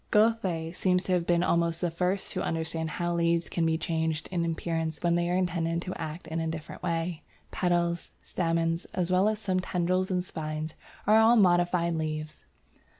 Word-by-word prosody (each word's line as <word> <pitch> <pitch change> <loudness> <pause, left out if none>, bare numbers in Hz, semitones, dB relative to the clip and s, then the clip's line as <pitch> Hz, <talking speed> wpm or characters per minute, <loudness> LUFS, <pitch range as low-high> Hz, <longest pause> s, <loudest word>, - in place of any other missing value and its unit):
Goethe 195 -7 +2
seems 180 0 +2
to 185 - -3
have 170 -2 +1
been 175 0 +3
almost 170 -1 +1
the 175 -1 0
first 180 +3 -1
to - - -2
understand 160 0 -2
how 175 +2 -2
leaves 170 0 +1
can 165 -1 0
be 160 0 +2
changed 160 -1 -1
in 175 -2 0
appearance 165 -1 -2
when 170 -1 +3
they 175 0 +1
are 180 - +1
intended 170 -2 0
to 185 - -4
act 160 +1 -6
in 165 +1 -3
a 160 - -1
different 160 -1 -6
way. 165 0 -2 0.3
Petals, 175 -1 0
stamens, 165 -1 0
as 180 -1 0
well 185 +3 +4
as 215 - -1
some 190 -3 0
tendrils 185 +1 0
and 180 -1 0
spines, 155 -1 -4 0.3
are 215 +2 +6
all 225 +2 +6
modified 175 -4 +3
leaves. 155 -1 -4
170 Hz, 185 wpm, -28 LUFS, 165-180 Hz, 0.3 s, are